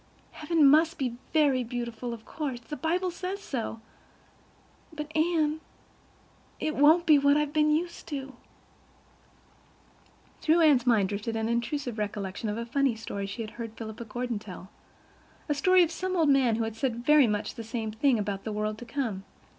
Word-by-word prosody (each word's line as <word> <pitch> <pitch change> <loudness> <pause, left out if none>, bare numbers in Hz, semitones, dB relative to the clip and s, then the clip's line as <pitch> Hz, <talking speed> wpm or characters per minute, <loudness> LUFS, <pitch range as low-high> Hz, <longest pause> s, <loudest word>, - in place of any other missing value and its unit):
Heaven 310 -1 +3
must 320 +4 +4
be 250 -5 -2
very 285 -5 +3
beautiful, 240 0 -5
of 230 -1 -8
course, 280 -6 -4
the 240 +5 -7
Bible 355 +4 -1
says 370 +3 -5
so—but, 295 - -10
Anne, 315 -1 +1 1.0
it 310 - -2
won't 315 +5 +5
be 305 -3 +6
what 285 +1 +4
've 300 -1 -1
been 305 0 +3
used 335 +3 -1
to." 275 -3 -5 2.1
Through 325 +2 +3
Anne's 280 -6 +4
mind 210 -6 +3
drifted 210 +2 -3
an 220 0 -1
intrusive 235 0 -2
recollection 205 0 -3
of 210 - -3
a 235 - -3
funny 270 0 +1
story 200 -3 -5
she 205 +4 -5
had 215 - -8
heard 225 -1 -6
Philippa 220 +1 -7
Gordon 240 0 -3
tell—the 205 - -10
story 370 +5 +5
of 335 - -1
some 370 +2 -3
old 320 -3 +3
man 265 -5 +4
who 225 - -1
had 225 -1 -4
said 240 0 -2
very 300 -3 +6
much 210 -1 -2
the 230 - -7
same 225 -1 -4
thing 240 +3 +2
about 200 -2 -3
the 220 - -4
world 215 +1 -2
to 245 - -8
come. 230 -6 -3
250 Hz, 170 wpm, -28 LUFS, 225-305 Hz, 2.1 s, be